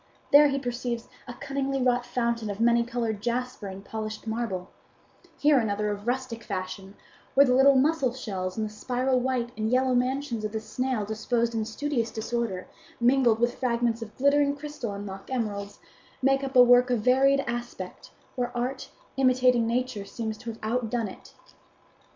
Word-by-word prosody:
There 295 Hz, +1 st, +8 dB
he 275 Hz, -1 st, 0 dB
perceives 245 Hz, -2 st, -3 dB, 0.2 s
a 245 Hz, -, -7 dB
cunningly 275 Hz, 0 st, -2 dB
wrought 245 Hz, -1 st, +1 dB
fountain 235 Hz, -3 st, -1 dB
of 205 Hz, 0 st, -5 dB
many 235 Hz, 0 st, +4 dB
coloured 230 Hz, -3 st, -3 dB
jasper 245 Hz, -1 st, -2 dB
and 195 Hz, +1 st, -8 dB
polished 215 Hz, 0 st, -5 dB
marble; 220 Hz, -5 st, -3 dB, 0.7 s
here 290 Hz, -2 st, +4 dB
another 210 Hz, -2 st, -1 dB
of 205 Hz, +2 st, -6 dB
rustic 245 Hz, -2 st, -2 dB
fashion 190 Hz, +1 st, -5 dB, 0.4 s
where 280 Hz, +1 st, +8 dB
the 250 Hz, -, +3 dB
little 270 Hz, +2 st, +6 dB
mussel 275 Hz, -1 st, +3 dB
shells 190 Hz, -7 st, -4 dB
and 220 Hz, -, 0 dB
the 210 Hz, -, -11 dB
spiral 255 Hz, +3 st, 0 dB
white 250 Hz, -1 st, -1 dB
and 215 Hz, 0 st, -1 dB
yellow 255 Hz, +1 st, +2 dB
mansions 250 Hz, -2 st, 0 dB
of 215 Hz, 0 st, -3 dB
the 220 Hz, -, -1 dB
snail 250 Hz, 0 st, -2 dB
disposed 230 Hz, +2 st, -1 dB
in 220 Hz, -1 st, -1 dB
studious 235 Hz, 0 st, -2 dB
disorder, 220 Hz, -4 st, -3 dB, 0.3 s
mingled 240 Hz, -2 st, +4 dB
with 240 Hz, +1 st, +2 dB
fragments 235 Hz, -2 st, 0 dB
of 215 Hz, -1 st, -9 dB
glittering 280 Hz, +1 st, +3 dB
crystal 285 Hz, -7 st, -6 dB
and 200 Hz, +1 st, -6 dB
mock 195 Hz, 0 st, -8 dB
emeralds, 205 Hz, -5 st, -3 dB, 0.4 s
make 270 Hz, +1 st, +2 dB
up 270 Hz, 0 st, -4 dB
a 250 Hz, -, +9 dB
work 245 Hz, +1 st, +6 dB
of 245 Hz, -3 st, +1 dB
varied 270 Hz, +4 st, +4 dB
aspect, 240 Hz, -7 st, -6 dB, 0.3 s
where 245 Hz, -2 st, -1 dB
art, 260 Hz, +2 st, -3 dB, 0.3 s
imitating 255 Hz, -3 st, +4 dB
nature, 245 Hz, -3 st, -1 dB
seems 220 Hz, +2 st, -4 dB
to 235 Hz, -, -7 dB
have 225 Hz, -, -7 dB
outdone 230 Hz, -1 st, -1 dB
it. -, -, -14 dB
240 Hz, 170 wpm, -27 LUFS, 220-260 Hz, 0.7 s, a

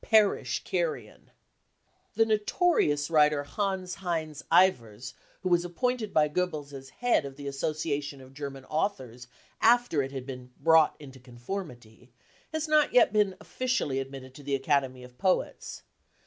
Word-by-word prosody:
Perish, 215 Hz, -3 st, +2 dB
carrion -, -, -3 dB
I -, -, -31 dB, 0.5 s
" -, -, -42 dB
The 225 Hz, -, +4 dB
notorious 210 Hz, -, +1 dB
writer 150 Hz, -2 st, +4 dB
Hanns 185 Hz, +3 st, -3 dB
Heinz 160 Hz, -5 st, -3 dB
Ewers, 120 Hz, -, +2 dB, 0.3 s
who 185 Hz, -, -1 dB
was 175 Hz, -1 st, +3 dB
appointed 220 Hz, +5 st, -2 dB
byGoebbels 150 Hz, -1 st, 0 dB
as 135 Hz, -1 st, -9 dB
head 245 Hz, -, +1 dB
of 140 Hz, -1 st, -8 dB
the 140 Hz, 0 st, -9 dB
Association 145 Hz, 0 st, -3 dB
of 130 Hz, 0 st, -14 dB
German 135 Hz, -1 st, -7 dB
Authors 130 Hz, -, -3 dB, 0.3 s
after 240 Hz, -9 st, +4 dB
it 135 Hz, 0 st, -4 dB
had 135 Hz, -2 st, -6 dB
been 125 Hz, -2 st, -9 dB
" -, -, -32 dB
brought 160 Hz, -2 st, +5 dB
into 135 Hz, -3 st, -12 dB
conformity 125 Hz, -, -8 dB, 0.4 s
55 -, -, -45 dB
has 315 Hz, 0 st, -1 dB
not 305 Hz, -1 st, +3 dB
yet 245 Hz, -3 st, +6 dB
been 205 Hz, -3 st, +2 dB
officially 250 Hz, -, -1 dB
admitted 135 Hz, -1 st, -7 dB
to 145 Hz, -, -12 dB
the 140 Hz, 0 st, -1 dB
Academy 135 Hz, -2 st, 0 dB
of 125 Hz, 0 st, -15 dB
Poets. 185 Hz, +5 st, -1 dB
150 Hz, 155 wpm, -28 LUFS, 135-195 Hz, 0.5 s, yet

